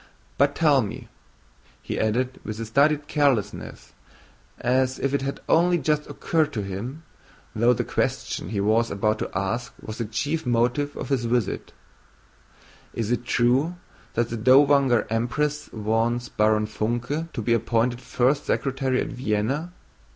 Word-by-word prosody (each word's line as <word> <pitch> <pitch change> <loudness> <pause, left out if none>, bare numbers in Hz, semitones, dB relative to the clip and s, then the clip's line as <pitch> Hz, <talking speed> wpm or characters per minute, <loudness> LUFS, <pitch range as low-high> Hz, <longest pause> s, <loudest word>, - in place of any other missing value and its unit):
"But 140 +1 +3
tell 150 -5 +4
me," 105 - -6 0.7
he - - -4
added 125 +4 0
with 110 +1 -5
studied 145 +5 +2
carelessness 130 -9 -1 0.7
as 130 +1 +1
if 135 0 -1
it 140 - +1
had 135 +1 -4
only 175 +2 +4
just 150 0 0
occurred 155 -2 0
to 105 - -2
him, 115 +11 -6 0.5
though 120 +3 +4
the 120 0 -1
question - - -2
he 105 - -2
was 110 +3 +2
about 105 +2 0
to - - -3
ask 115 +7 -2
was 110 +2 -8
the 115 - -1
chief 145 +9 -2
motive 125 +4 0
of - - -5
his 130 -4 0
visit, 120 -3 -1 1.2
"is 115 -1 -2
it 120 0 -1
true 130 +9 +2 0.4
that 120 0 +1
the 115 - -3
Dowager 135 +1 +5
Empress 145 +6 -1
wants 115 +2 0
Baron 105 0 +2
Funke 120 +9 -2
to 120 - -4
be 115 - +2
appointed 115 +2 +1
first 135 +4 +1
secretary 135 -1 0
at - - -3
Vienna? 125 +7 -1
125 Hz, 145 wpm, -24 LUFS, 115-140 Hz, 1.2 s, Dowager